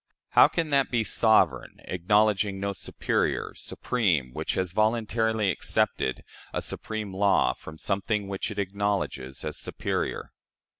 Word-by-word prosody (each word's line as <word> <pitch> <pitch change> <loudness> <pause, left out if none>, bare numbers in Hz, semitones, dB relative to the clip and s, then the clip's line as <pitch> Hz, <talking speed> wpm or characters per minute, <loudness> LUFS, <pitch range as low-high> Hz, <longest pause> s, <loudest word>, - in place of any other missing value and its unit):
How - - +7
can 165 -3 -2
that 140 -1 +3
be 120 -2 +1
sovereign, 100 - +2
acknowledging 100 +2 +2
no 100 0 -2
superior, 95 - -1
supreme, 85 - -1
which - - -2
has 95 -2 -1
voluntarily 110 0 +1
accepted 65 - -1 0.3
a - - 0
supreme 110 -3 -4
law 100 +1 +3
from 80 - -11
something 100 +3 -1
which 95 +2 -3
it 105 - -7
acknowledges 100 -10 -2
as - - -3
superior?" - - -3
100 Hz, 130 wpm, -27 LUFS, 95-110 Hz, 0.3 s, How